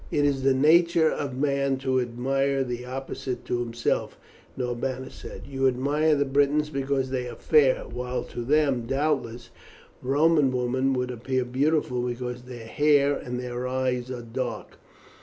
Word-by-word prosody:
"It 145 Hz, -1 st, +1 dB
is 140 Hz, -2 st, +1 dB
the 135 Hz, 0 st, +3 dB
nature 165 Hz, +3 st, +4 dB
of 135 Hz, -3 st, -4 dB
man 140 Hz, -1 st, +1 dB
to 130 Hz, -1 st, 0 dB
admire 135 Hz, +3 st, 0 dB
the 125 Hz, -1 st, -5 dB
opposite 130 Hz, 0 st, -5 dB
to 120 Hz, -, -1 dB
himself," 120 Hz, -1 st, -2 dB, 0.4 s
Norbanus 125 Hz, +1 st, -3 dB
said. -, -, -9 dB
"You 135 Hz, -1 st, +1 dB
admire 145 Hz, +5 st, +2 dB
the 145 Hz, 0 st, +1 dB
Britons 145 Hz, +2 st, +2 dB
because 135 Hz, -1 st, -1 dB
they 125 Hz, -2 st, -2 dB
are 120 Hz, -, -8 dB
fair, 145 Hz, +1 st, +3 dB
while 125 Hz, 0 st, -4 dB
to 120 Hz, -, -7 dB
them, 135 Hz, -3 st, +2 dB
doubtless, 130 Hz, -4 st, -1 dB, 0.5 s
Roman 145 Hz, +1 st, +3 dB
women 130 Hz, +2 st, 0 dB
would 125 Hz, -1 st, -1 dB
appear 125 Hz, +1 st, -2 dB
beautiful 130 Hz, 0 st, 0 dB
because 125 Hz, 0 st, -4 dB
their 120 Hz, -3 st, -9 dB
hair 145 Hz, +3 st, +3 dB
and 125 Hz, -2 st, -5 dB
their 125 Hz, 0 st, -4 dB
eyes 130 Hz, -1 st, -1 dB
are 125 Hz, -2 st, -5 dB
dark." 115 Hz, -1 st, -5 dB
130 Hz, 155 wpm, -26 LUFS, 125-140 Hz, 0.5 s, nature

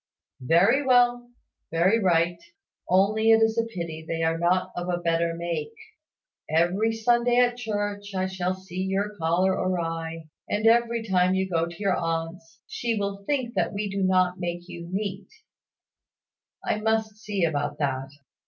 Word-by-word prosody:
"Very 195 Hz, -, +4 dB
well 245 Hz, -2 st, +3 dB, 0.4 s
very 180 Hz, +7 st, +3 dB
right: 170 Hz, -3 st, +2 dB, 0.5 s
only 210 Hz, +4 st, +3 dB
it 225 Hz, 0 st, +6 dB
is 225 Hz, 0 st, +2 dB
a 230 Hz, -, +1 dB
pity 170 Hz, -7 st, -6 dB
they 165 Hz, +1 st, -3 dB
are 165 Hz, 0 st, +1 dB
not 180 Hz, +2 st, +1 dB
of 175 Hz, 0 st, -4 dB
a 175 Hz, -, 0 dB
better 170 Hz, -1 st, 0 dB
make. 170 Hz, -3 st, -4 dB, 0.7 s
Every 175 Hz, +8 st, +2 dB
Sunday 240 Hz, +2 st, +2 dB
at 245 Hz, -1 st, +3 dB
church, 205 Hz, -3 st, -4 dB
I 185 Hz, 0 st, 0 dB
shall 185 Hz, -1 st, -2 dB
see 185 Hz, -1 st, -7 dB
your 195 Hz, +2 st, -1 dB
collar 175 Hz, +2 st, +1 dB
awry 165 Hz, -3 st, -2 dB, 0.3 s
and 210 Hz, +1 st, -1 dB
every 235 Hz, 0 st, +3 dB
time 185 Hz, -1 st, +3 dB
you 190 Hz, 0 st, 0 dB
go 170 Hz, -2 st, 0 dB
to 170 Hz, -1 st, -10 dB
your 200 Hz, -3 st, +1 dB
aunt's, 165 Hz, 0 st, -4 dB
she 245 Hz, -, -2 dB
will 200 Hz, -1 st, -3 dB
think 260 Hz, -5 st, -1 dB, 0.2 s
we 200 Hz, 0 st, -3 dB
do 195 Hz, 0 st, -2 dB
not 185 Hz, -1 st, +2 dB
make 175 Hz, -1 st, -4 dB
you 170 Hz, -1 st, -8 dB
neat. 195 Hz, 0 st, -4 dB, 1.4 s
I 210 Hz, -, 0 dB
must 220 Hz, -1 st, 0 dB
see 205 Hz, -4 st, -1 dB
about 145 Hz, -2 st, -2 dB
that. 135 Hz, -2 st, -2 dB
185 Hz, 155 wpm, -25 LUFS, 170-215 Hz, 1.4 s, it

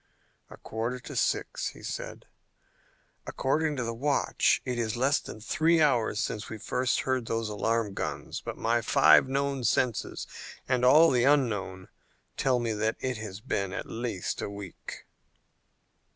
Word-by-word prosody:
"A -, -, -12 dB
quarter 115 Hz, +3 st, -4 dB
to -, -, -9 dB
six," -, -, 0 dB
he -, -, -9 dB
said. -, -, -6 dB, 1.0 s
"According 150 Hz, +3 st, 0 dB
to 125 Hz, -, -2 dB
the 115 Hz, 0 st, -3 dB
watch 140 Hz, +4 st, +2 dB
it 125 Hz, -2 st, -2 dB
is 110 Hz, -1 st, -1 dB
less 135 Hz, +4 st, +3 dB
than -, -, -9 dB
three 160 Hz, +9 st, +2 dB
hours 125 Hz, -8 st, +2 dB
since 105 Hz, -, -3 dB
we 110 Hz, -, -6 dB
first 125 Hz, +4 st, 0 dB
heard 130 Hz, -3 st, -1 dB
those 115 Hz, -1 st, -1 dB
alarm 110 Hz, 0 st, 0 dB
guns, -, -, -4 dB
but -, -, -6 dB
my 115 Hz, +1 st, +1 dB
five 80 Hz, +1 st, +5 dB
known 140 Hz, -1 st, -1 dB
senses 120 Hz, 0 st, 0 dB, 0.4 s
and 125 Hz, -1 st, +1 dB
all 155 Hz, +6 st, +7 dB
the 125 Hz, -1 st, +3 dB
unknown 105 Hz, -10 st, +1 dB, 0.5 s
tell 130 Hz, -2 st, +2 dB
me 115 Hz, -2 st, -1 dB
that 110 Hz, +1 st, 0 dB
it 130 Hz, -2 st, -2 dB
has 105 Hz, -2 st, -7 dB
been 100 Hz, -3 st, -2 dB
at -, -, -4 dB
least 115 Hz, -5 st, -4 dB
a -, -, -3 dB
week." 100 Hz, -3 st, -9 dB
120 Hz, 155 wpm, -28 LUFS, 110-130 Hz, 1.0 s, all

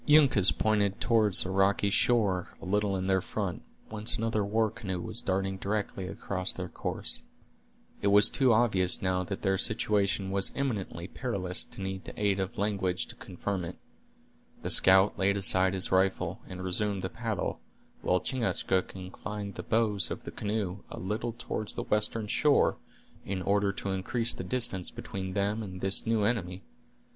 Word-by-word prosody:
Uncas 135 Hz, -11 st, +6 dB
pointed 105 Hz, -1 st, +1 dB
toward 110 Hz, -5 st, +2 dB
a -, -, -4 dB
rocky 100 Hz, +1 st, +2 dB
shore 100 Hz, -6 st, +1 dB
a -, -, -10 dB
little 100 Hz, +1 st, 0 dB
in 95 Hz, 0 st, -2 dB
their 95 Hz, 0 st, +2 dB
front, 100 Hz, -2 st, -4 dB, 0.3 s
whence 110 Hz, +1 st, 0 dB
another 110 Hz, -1 st, 0 dB
war 110 Hz, +1 st, +1 dB
canoe 95 Hz, -5 st, -5 dB
was 110 Hz, +6 st, -3 dB
darting 95 Hz, -2 st, -1 dB
directly 100 Hz, -1 st, -3 dB
across 95 Hz, 0 st, -3 dB
their 90 Hz, -1 st, -4 dB
course. -, -, -2 dB, 0.8 s
It -, -, +1 dB
was 105 Hz, +1 st, +6 dB
too 130 Hz, -3 st, +2 dB
obvious 100 Hz, -6 st, +2 dB
now 90 Hz, -1 st, +1 dB
that 95 Hz, +1 st, -5 dB
their 95 Hz, -1 st, +1 dB
situation 100 Hz, -3 st, +1 dB
was 100 Hz, 0 st, +2 dB
imminently 105 Hz, -10 st, -3 dB
perilous 95 Hz, -5 st, +1 dB
to -, -, -11 dB
need 95 Hz, 0 st, -5 dB
the -, -, -9 dB
aid 100 Hz, -2 st, +1 dB
of 95 Hz, -1 st, -4 dB
language 95 Hz, -3 st, -1 dB
to -, -, -9 dB
confirm 95 Hz, +1 st, -4 dB
it. 85 Hz, +1 st, -7 dB, 0.9 s
The -, -, 0 dB
scout 95 Hz, +2 st, +5 dB
laid 100 Hz, +1 st, +2 dB
aside 95 Hz, -1 st, +5 dB
his 95 Hz, -, +1 dB
rifle, 95 Hz, +1 st, +1 dB
and 95 Hz, 0 st, -7 dB
resumed 100 Hz, +1 st, +2 dB
the 95 Hz, -, -2 dB
paddle, 115 Hz, -3 st, -3 dB, 0.4 s
while 90 Hz, 0 st, +1 dB
Chingachgook 115 Hz, -8 st, -1 dB
inclined 100 Hz, +2 st, -7 dB
the -, -, -6 dB
bows 105 Hz, -5 st, +1 dB
of -, -, -6 dB
the -, -, -7 dB
canoe 105 Hz, -3 st, -3 dB
a -, -, -8 dB
little 110 Hz, +5 st, -3 dB
toward 110 Hz, -2 st, -4 dB
the -, -, -3 dB
western 105 Hz, +1 st, 0 dB
shore, 145 Hz, +7 st, +2 dB, 0.5 s
in 95 Hz, -1 st, -4 dB
order 100 Hz, 0 st, +2 dB
to 100 Hz, 0 st, -4 dB
increase 115 Hz, +5 st, 0 dB
the -, -, -6 dB
distance 120 Hz, -8 st, -1 dB
between 95 Hz, -1 st, -6 dB
them 100 Hz, +2 st, -1 dB
and 95 Hz, -3 st, -7 dB
this 95 Hz, +4 st, +1 dB
new 110 Hz, -2 st, +2 dB
enemy. 100 Hz, -4 st, -1 dB
100 Hz, 170 wpm, -29 LUFS, 95-110 Hz, 0.9 s, Uncas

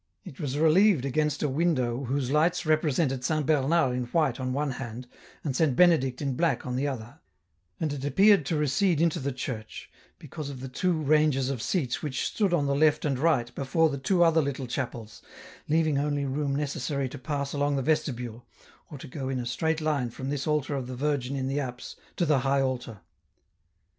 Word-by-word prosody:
It 130 Hz, -, -11 dB
was 140 Hz, -2 st, -3 dB
relieved 160 Hz, 0 st, +4 dB
against 150 Hz, +2 st, 0 dB
a -, -, +2 dB
window 135 Hz, -4 st, 0 dB
whose 130 Hz, 0 st, -1 dB
lights 165 Hz, +4 st, +2 dB
represented 155 Hz, -4 st, +1 dB
Saint 155 Hz, +1 st, 0 dB
Bernard 150 Hz, -2 st, +2 dB
in 125 Hz, -1 st, -2 dB
white 135 Hz, -1 st, 0 dB
on 130 Hz, 0 st, -2 dB
one 145 Hz, +2 st, -1 dB
hand, 125 Hz, -1 st, -6 dB, 0.4 s
and 140 Hz, -5 st, -2 dB
Saint 150 Hz, -5 st, +2 dB
Benedict 150 Hz, -6 st, +3 dB
in 140 Hz, -2 st, -1 dB
black 165 Hz, +1 st, 0 dB
on 125 Hz, -1 st, -3 dB
the 135 Hz, +3 st, 0 dB
other, 120 Hz, -4 st, -6 dB, 0.6 s
and 155 Hz, -3 st, -1 dB
it 140 Hz, -2 st, -6 dB
appeared 195 Hz, +6 st, +5 dB
to 165 Hz, -, 0 dB
recede 150 Hz, +4 st, +1 dB
into 165 Hz, -1 st, +2 dB
the 140 Hz, +1 st, -2 dB
church, 120 Hz, -4 st, -6 dB, 0.3 s
because 150 Hz, 0 st, -7 dB
of 135 Hz, -2 st, -7 dB
the 130 Hz, -, -6 dB
two 180 Hz, +8 st, 0 dB
ranges 150 Hz, -3 st, +2 dB
of 130 Hz, -5 st, -4 dB
seats 135 Hz, -, -1 dB
which 145 Hz, -4 st, -2 dB
stood 205 Hz, -4 st, 0 dB
on 165 Hz, -5 st, +2 dB
the 140 Hz, -, +1 dB
left 150 Hz, +1 st, +3 dB
and 135 Hz, -4 st, 0 dB
right 130 Hz, -6 st, +1 dB
before 150 Hz, +5 st, +1 dB
the 140 Hz, -, -4 dB
two 175 Hz, +6 st, +3 dB
other 165 Hz, -1 st, +4 dB
little 140 Hz, -2 st, -3 dB
chapels, 120 Hz, -3 st, -5 dB, 0.5 s
leaving 155 Hz, -2 st, +2 dB
only 145 Hz, -1 st, -1 dB
room 140 Hz, +1 st, -1 dB
necessary 140 Hz, -1 st, -2 dB
to 125 Hz, -, -9 dB
pass 140 Hz, +1 st, -3 dB
along 145 Hz, 0 st, 0 dB
the 135 Hz, -, -1 dB
vestibule, 125 Hz, -6 st, -1 dB, 0.5 s
or 145 Hz, -, -8 dB
to 140 Hz, -, -10 dB
go 135 Hz, 0 st, -5 dB
in 135 Hz, -, -1 dB
a 125 Hz, -, -3 dB
straight 160 Hz, +6 st, -1 dB
line 145 Hz, -6 st, 0 dB
from 130 Hz, +3 st, -5 dB
this 145 Hz, 0 st, -3 dB
altar 150 Hz, -1 st, 0 dB
of 135 Hz, -3 st, -3 dB
the 130 Hz, -, -6 dB
Virgin 140 Hz, -1 st, -1 dB
in 130 Hz, -1 st, -2 dB
the 135 Hz, +2 st, -1 dB
apse, 125 Hz, -3 st, -6 dB, 0.2 s
to 175 Hz, -, +1 dB
the 150 Hz, -3 st, +3 dB
high 135 Hz, +1 st, +1 dB
altar. 125 Hz, -6 st, -3 dB
140 Hz, 205 wpm, -27 LUFS, 130-155 Hz, 0.6 s, appeared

